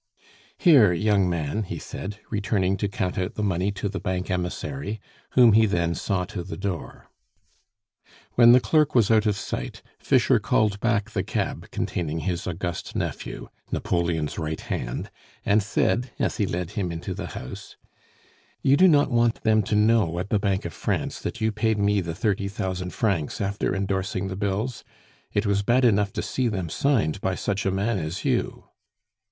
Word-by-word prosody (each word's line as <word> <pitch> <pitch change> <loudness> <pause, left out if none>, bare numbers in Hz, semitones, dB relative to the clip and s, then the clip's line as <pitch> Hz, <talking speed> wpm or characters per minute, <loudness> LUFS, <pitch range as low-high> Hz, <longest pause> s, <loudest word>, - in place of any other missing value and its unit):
"Here, 135 - +6
young 100 0 +2
man," 85 +4 -1
he 100 - -4
said, 100 +1 -6
returning 100 -3 +1
to 100 - -1
count 95 -2 -2
out 90 +2 -3
the 105 - -2
money 95 0 0
to 100 - -3
the 95 -1 -4
bank 95 +1 -2
emissary, 100 +6 -3 0.3
whom 120 -4 +7
he 110 +1 +5
then 85 -3 0
saw 95 0 -1
to 90 0 -6
the 90 - -7
door. 95 -4 -5 1.2
When 120 -1 +7
the 125 - +8
clerk 150 +5 +2
was 115 -3 +4
out 110 -1 +4
of 105 - +2
sight, - - -5 0.2
Fischer - - +3
called 105 -2 +1
back 115 -1 0
the - - 0
cab - - -3
containing 80 -2 -2
his 90 -2 -2
august 85 0 -4
nephew, - - -4 0.2
Napoleon's 85 -4 -1
right 80 -1 -3
hand, - - -4 0.3
and 105 +2 +4
said, 120 +4 0
as - - -1
he 105 -5 +1
led 90 0 -3
him 100 -4 -2
into 85 +3 -5
the 95 -1 -5
house: - - -8 0.9
"You 135 +1 +5
do 185 - +7
not 145 -5 +4
want 120 -1 +2
them 110 -1 +4
to 105 +1 -1
know 105 -5 +3
at 90 +3 -3
the 105 - +3
Bank 100 -1 0
of - - -4
France - - -2
that 115 - -5
you 110 0 +2
paid 110 0 0
me 100 0 +2
the 85 -2 -5
thirty 100 -1 0
thousand 95 -2 -3
francs, 95 -9 -1
after 100 0 -1
endorsing 95 0 -2
the 95 - -4
bills? 100 +5 -2 0.5
It 105 - 0
was 100 -1 +2
bad 120 +5 +3
enough 105 -3 +3
to - - -3
see 130 -2 -1
them 95 -7 -2
signed 100 - +1
by 95 -1 0
such 100 0 -2
a - - +2
man 100 +2 0
as 80 +2 -4
you! - - 0
100 Hz, 180 wpm, -25 LUFS, 90-110 Hz, 1.2 s, the